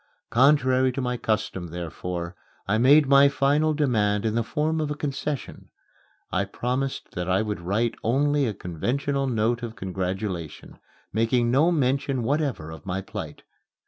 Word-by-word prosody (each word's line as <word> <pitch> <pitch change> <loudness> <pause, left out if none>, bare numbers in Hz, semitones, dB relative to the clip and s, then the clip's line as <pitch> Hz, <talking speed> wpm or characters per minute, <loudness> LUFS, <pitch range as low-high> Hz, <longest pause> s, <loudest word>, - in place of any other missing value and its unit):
Contrary 130 0 +4
to 130 - -5
my 125 -1 -1
custom, 110 -6 -2
therefore, 85 +1 -5 0.3
I 105 +3 +2
made 145 +5 +6
my 140 +1 +7
final 145 +3 +2
demand 110 -8 +1
in 110 - +1
the 115 - +1
form 155 +7 -1
of 150 - -2
a 150 - -2
concession. 145 -1 -4 0.6
I 100 +2 +1
promised 130 +6 -3
that 90 +1 -4
I 95 +3 +2
would 105 -4 -4
write 105 +6 0
only 140 +3 +2
a 110 - -2
conventional 135 - -2
note 120 0 0
of 115 -1 -6
congratulation, 95 -3 -4 0.3
making 120 +2 +2
no 150 +7 +4
mention 135 -3 0
whatever 135 - -1
of 80 -2 -10
my 95 0 -3
plight. - - -7
120 Hz, 150 wpm, -25 LUFS, 95-140 Hz, 0.6 s, my